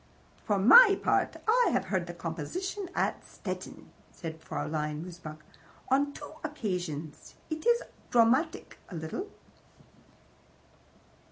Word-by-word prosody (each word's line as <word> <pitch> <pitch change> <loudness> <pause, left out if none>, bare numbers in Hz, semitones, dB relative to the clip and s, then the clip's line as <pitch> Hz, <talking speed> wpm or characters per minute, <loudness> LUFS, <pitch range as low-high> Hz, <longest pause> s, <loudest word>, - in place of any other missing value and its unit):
"For 205 - +2
my 395 - +8
part, - - +1
I 480 +2 +5
have - - +1
heard 185 -3 -1
the 175 - -7
composition 345 - -4
at - - 0
Stettin," - - -7 0.2
said 160 -2 -7
Fraulein 150 0 -3
Mosebach. 155 -4 -10 0.5
"On 280 +2 +3
two - - -9
occasions. 180 - -4 0.2
It 315 +8 -3
is 475 0 +4 0.3
dramatic, 250 +7 +2
a 180 - -8
little." 160 - -4
195 Hz, 110 wpm, -30 LUFS, -, 0.5 s, my